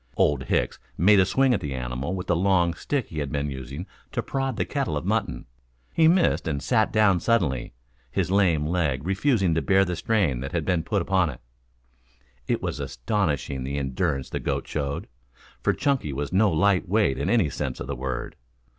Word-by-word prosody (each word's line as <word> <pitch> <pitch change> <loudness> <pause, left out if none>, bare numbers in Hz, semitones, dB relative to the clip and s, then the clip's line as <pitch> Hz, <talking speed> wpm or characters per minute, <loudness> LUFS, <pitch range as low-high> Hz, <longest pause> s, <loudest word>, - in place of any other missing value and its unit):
Old 70 -3 +2
Hicks - - 0 0.2
made 100 +3 +6
a 95 - +4
swing 135 +4 +3
at 110 - 0
the 70 -2 -4
animal 65 +7 -3
with 90 - -4
the 90 - +1
long 90 -1 +2
stick 140 +3 -2
he 80 - -5
had 70 -2 -3
been 70 0 -2
using 70 +5 -6 0.3
to - - -1
prod 135 -2 -2
the - - 0
kettle - - -2
of - - -5
mutton. - - -1 0.5
He 160 -1 +5
missed 175 - +3
and 75 -3 -1
sat 110 - +1
down 105 -4 +4
suddenly, 85 - 0 0.4
his 75 - -1
lame 90 -7 +3
leg 75 -5 0
refusing 95 - +2
to 80 - +1
bear 95 0 +3
the 90 -1 -2
strain 85 - +1
that 70 +2 -5
had 85 -3 -1
been 90 -3 +1
put 95 +3 -1
upon 90 -2 +2
it. 60 - -8 1.1
It - - -1
was - - -3
astonishing 70 - -2
the 70 +2 -3
endurance 65 0 -2
the - - -2
goat - - -2
showed, 70 -2 -3 0.6
for - - +2
Chunky 135 - 0
was 70 +4 -4
no 100 +1 +4
light 90 +3 +2
weight 100 -10 +2
in 70 - -1
any 105 -11 +3
sense - - -4
of - - -4
the 70 +1 -4
word. 65 0 -4
85 Hz, 200 wpm, -25 LUFS, 70-100 Hz, 1.1 s, made